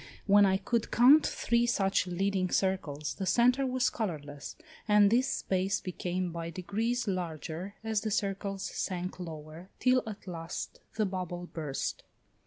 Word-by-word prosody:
When 205 0 +6
I 190 0 +3
could 230 +3 -1
count 270 +6 +6
three 235 0 +1
such 195 -4 +2
leading 185 +1 0
circles, 160 -7 -1
the 190 - -4
centre 250 +7 +4
was 255 -1 +1
colourless, 150 -10 -5 0.3
and 210 -1 +6
this 250 +3 +3
space 190 -5 0
became 180 0 -3
by 165 0 -4
degrees 220 +8 -2
larger 175 +1 -4
as 220 -2 0
the 220 - -2
circles 195 -1 -2
sank 185 0 -3
lower, 160 +1 -8
till 255 0 +3
at 215 -1 -7
last 165 -3 -6 0.2
the 220 -1 +2
bubble 180 -2 -4
burst. 150 -4 -3
190 Hz, 145 wpm, -30 LUFS, 175-215 Hz, 0.3 s, When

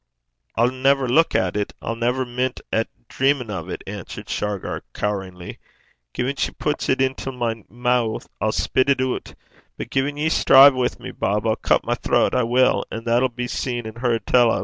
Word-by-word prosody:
'I'll 120 +2 +3
never 135 +1 +2
luik 160 +7 +3
at 95 0 +1
it; 105 -1 -2
I'll 115 - -4
never 125 +3 0
mint 125 +1 -2
at 115 - +1 0.2
dreamin' 135 -4 0
o' 95 -5 -4
't,' 90 - -6
answered 100 -2 -8
Shargar, 105 -2 -3
coweringly. 95 -4 -4 0.6
'Gin 130 +3 -1
she - - -1
pits 150 -1 -2
't 130 - +2
intil 135 0 -1
my 115 -3 -3
moo', 120 -1 0 0.2
I'll 110 - +2
spit 130 +4 +1
it 140 - +3
oot. 130 -1 -2 0.4
But - - -7
gin 140 +2 0
ye 155 +2 +1
strive 140 -2 +7
wi' 130 -1 +1
me, - - -7
Bob, 105 +2 -1
I'll 110 -1 +2
cut - - +1
my - - +1
throat - - +1
I 125 - +3
will; 125 +2 +3
an' 115 - -6
that'll 120 +3 +2
be 125 0 -4
seen 120 -2 -3
and 110 +1 -8
heard 115 -3 0
tell 120 -2 +4
o'.' - - 0
120 Hz, 195 wpm, -22 LUFS, 110-130 Hz, 0.6 s, strive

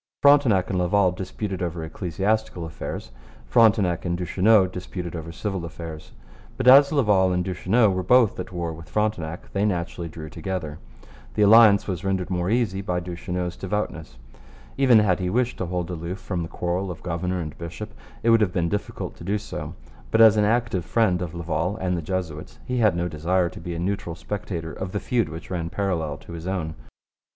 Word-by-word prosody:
Frontenac 135 -11 +5
and 95 - 0
Laval 90 +1 +3
disputed 95 +1 -5
over 85 -2 -3
ecclesiastical 95 +3 -2
affairs. 80 -6 -6 0.3
Frontenac 105 -7 +3
and 85 -1 -1
Duchesneau 95 +3 +4
disputed 90 -1 -6
over 80 0 -6
civil 95 +1 -4
affairs. 80 -2 -8 0.5
But 130 - -1
as 140 +2 +8
Laval 105 -10 +3
and 90 0 0
Duchesneau 95 +4 +2
were 95 0 -1
both 115 +2 +4
at 90 - -5
war 85 -2 -3
with 80 0 -11
Frontenac 90 -6 -2
they 100 - +1
naturally 85 -3 -2
drew 80 -1 -8
together. 80 -2 -5 0.6
The 105 - +3
alliance 105 -1 +7
was 90 -4 -3
rendered 95 -1 -1
more 90 0 0
easy 110 -4 +1
by 90 -2 -1
Duchesneau's 90 0 -4
devoutness. 85 -10 -4 0.6
Even 130 -4 +5
had 105 -4 +3
he 90 -1 -1
wished 125 +4 0
to 95 - -2
hold 90 0 -3
aloof 85 +2 -4
from 90 -3 -4
the 80 - -5
quarrel 90 +2 -2
of 80 -4 -8
governor 90 +1 -2
and 75 -3 -5
bishop, 90 +6 -7 0.3
it 115 - +4
would 115 -1 +5
have 100 -4 +2
been 85 -3 0
difficult 105 +2 -4
to - - -11
do 100 +4 0
so. 105 +1 -6 0.3
But 110 - +2
as 110 -1 +8
an 105 -1 +3
active 115 -4 +1
friend 95 -2 +1
of 85 -2 -5
Laval 85 +4 -2
and 90 -3 -1
the 85 - -2
Jesuits 80 -3 -4
he 125 - -2
had 105 -6 +4
no 85 0 -1
desire 85 +3 0
to - - -11
be 85 0 -5
a - - -4
neutral 90 -2 -2
spectator 85 -4 -5
of 95 -1 -6
the 105 - 0
feud 115 -6 0
which 80 +3 -9
ran 85 -2 -2
parallel 85 -6 -1
with - - -18
his 85 0 -7
own. 90 -5 -2
90 Hz, 195 wpm, -24 LUFS, 85-105 Hz, 0.6 s, as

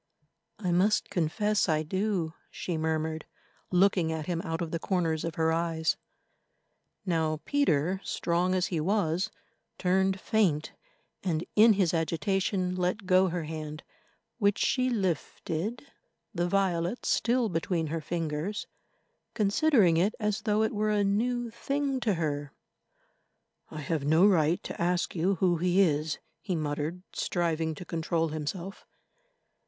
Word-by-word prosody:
"I 185 -5 -2
must 190 +5 +2
confess 205 +5 +1
I 155 0 +2
do," 185 -1 -1 0.2
she 175 - -4
murmured, 160 0 -2 0.4
looking 180 -3 +3
at 160 -1 -3
him 170 -1 -2
out 165 0 -3
of 165 -2 -3
the 165 - -2
corners 165 -4 0
of 165 -1 -3
her 160 0 +2
eyes. 165 -1 0 1.1
Now 160 -4 0
Peter, 190 - +1
strong 175 +2 0
as 185 0 +2
he 165 - +1
was, 185 +2 +1 0.5
turned 190 +1 +2
faint, 185 -9 +1 0.5
and 170 -3 -1
in 220 +1 +7
his 190 -4 +1
agitation 180 +3 0
let 185 +3 -1
go 185 0 +4
her 175 -1 -2
hand 155 0 -6 0.6
which 200 -2 +3
she 255 -1 +2
lifted, 190 - -2 0.5
the 175 -2 0
violets 185 +2 0
still 240 0 +2
between 165 -2 -1
her 165 - -2
fingers, 165 +4 -3 0.7
considering 210 - +4
it 195 +6 +2
as 210 -1 -1
though 215 0 +2
it 220 - 0
were 215 0 0
a 210 -1 +2
new 235 +4 0
thing 275 +2 -1
to 215 -6 +1
her. 145 -3 -2 1.2
"I 155 - -6
have 150 +1 -2
no 160 +6 +5
right 170 -4 +3
to - - -6
ask 175 +1 +1
you 180 +4 +2
who 175 -1 +2
he 180 +3 +2
is," 155 -4 +2 0.2
he 185 -4 -2
muttered, 155 +3 -3
striving 165 -2 -1
to 180 - -9
control 165 0 -1
himself. 170 +5 -5
175 Hz, 140 wpm, -29 LUFS, 160-200 Hz, 1.2 s, in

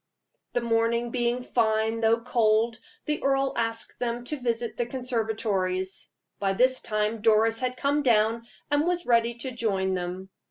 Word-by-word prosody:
The 245 - +1
morning 235 +1 +1
being 240 0 0
fine, 220 -1 +1
though 225 +1 +3
cold, 225 -1 +2 0.3
the 300 0 -2
earl 270 0 +1
asked 230 -1 -2
them 240 0 -2
to 295 +4 -2
visit 235 -1 -2
the 240 - -2
conservatories. 215 -7 -1 0.3
By 195 -1 +1
this 255 +5 +3
time 215 +1 -1
Doris 225 +1 +3
had 255 0 -2
come 285 +2 +1
down, 230 -2 +2 0.2
and 290 +3 +2
was 355 -1 0
ready 235 -1 +2
to 250 +2 -5
join 195 -6 0
them. 180 +1 -4
230 Hz, 155 wpm, -26 LUFS, 220-245 Hz, 0.3 s, though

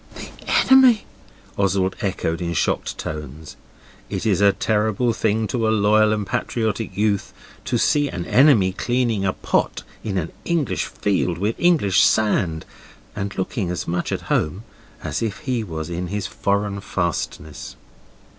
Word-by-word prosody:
'The - - -8 0.4
enemy!' 260 -4 +7 0.5
Oswald 95 -1 +1
echoed 85 -4 -2
in 85 -1 -2
shocked - - -1
tones. 75 0 -7 0.5
It - - -3
is 100 -3 +2
a 100 0 +6
terrible 110 +3 0
thing 110 0 0
to 115 -1 0
a - - +3
loyal 110 0 +4
and 105 -1 -1
patriotic 110 +1 -2
youth 105 -2 0 0.3
to 120 - 0
see 145 +4 +2
an 90 -6 -5
enemy 125 -9 +5
cleaning 120 -2 0
a 95 - +1
pot - - -1 0.2
in 100 -3 -2
an 80 -3 -2
English 165 -6 0
field, 95 -4 -1
with 105 +5 0
English 160 - +4
sand, 95 -7 +2 0.5
and 100 -1 -4
looking 95 0 -2
as 90 - -3
much 90 +1 -2
at - - -2
home 90 +8 -1 0.4
as - - -3
if 110 -4 -3
he 125 -4 -1
was 80 -5 -5
in 90 +1 -3
his 100 +1 -3
foreign 100 0 -1
fastnesses. 85 -4 -4
100 Hz, 150 wpm, -22 LUFS, 90-115 Hz, 0.5 s, enemy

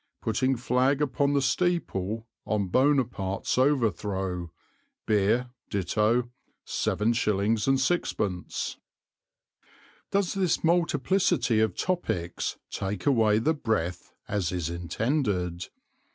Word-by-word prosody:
Putting 130 +4 +1
flag 125 +3 +1
upon 140 0 +1
the 140 - +2
steeple 115 - 0 0.2
on 100 -3 -1
Buonaparte's 120 -6 +1
overthrow; 100 - 0 0.5
beer 110 +4 +2 0.2
ditto 110 +5 +1 0.3
7/6." 110 - 0 1.3
Does 195 -2 +1
this 190 -4 +1
multiplicity 170 - +2
of 110 -4 +1
topics 95 - -2
take 95 -1 -3
away 110 -6 +4
the 150 +9 +2
breath, 90 - -2 0.2
as 100 -5 -1
is 85 -2 -2
intended? 90 - -1
115 Hz, 85 wpm, -27 LUFS, 95-140 Hz, 1.3 s, away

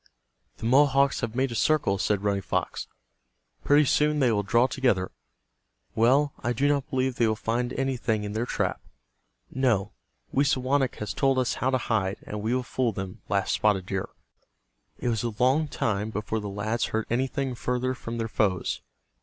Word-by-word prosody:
"The - - -7
Mohawks 140 +2 +4
have 115 0 -3
made 130 0 +1
a - - -3
circle," 115 -6 +2
said 100 +1 0
Running 100 -1 +1
Fox. - - -2 0.8
"Pretty 145 +1 +5
soon 150 +2 +2
they 130 -5 +3
will 105 -2 +2
draw 115 +5 +3
together. 125 -8 0 0.8
Well, 135 +6 +3
I 120 +1 0
do 140 +5 +1
not 140 -2 0
believe 130 -2 0
they 115 - +3
will 110 - +1
find 120 +3 -1
anything 125 -5 -1
in 105 0 -4
their 115 +3 -2
trap." - - -1 0.7
"No, 115 -7 +1 0.4
Wisawanik 135 -1 +2
has 105 - -4
told 135 -1 +2
us 130 -2 +1
how 130 - +2
to 130 - +2
hide, 105 -5 -1
and 105 0 -5
we 115 +4 0
will 130 - 0
fool 125 -1 0
them," 95 -2 -6
laughed 100 0 0
Spotted 100 -4 +2
Deer. 95 0 -3 0.9
It 125 - -2
was 110 -3 0
a 115 -3 -3
long 135 +6 +3
time 105 -5 -1
before 110 +1 -3
the 105 -1 -5
lads 110 +4 -1
heard 110 0 -2
anything 130 +2 -1
further 125 +1 -1
from 115 -2 -6
their 115 -1 -2
foes. 100 -5 0
120 Hz, 180 wpm, -26 LUFS, 105-130 Hz, 0.9 s, Pretty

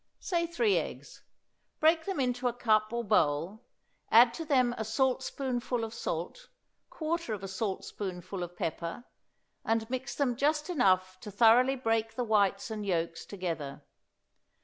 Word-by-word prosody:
Say 340 -2 -1
three 395 +5 +2
eggs; - - -8 0.6
break 320 +1 +4
them 385 -6 -2
into 250 -1 0
a 240 - 0
cup 215 -3 +2
or 235 0 -2
bowl; 185 0 +1 0.4
add 235 +1 +7
to 330 - -5
them 255 -5 +3
a 220 - -3
saltspoonful 250 +1 -1
of 225 0 -5
salt, 235 - -5 0.4
quarter 320 -7 -2
of 195 - -10
a - - -4
saltspoonful 190 -2 -4
of 175 0 -6
pepper, 170 +7 -4 0.6
and 225 0 0
mix 260 0 -3
them 265 -4 +1
just 300 +5 0
enough 185 - +2
to 210 - -8
thoroughly 235 +5 +5
break 225 -3 -1
the 245 - -1
whites 205 -1 +1
and 215 -1 -4
yolks 170 -3 -2
together. 165 -8 -5
225 Hz, 150 wpm, -30 LUFS, 190-260 Hz, 0.6 s, add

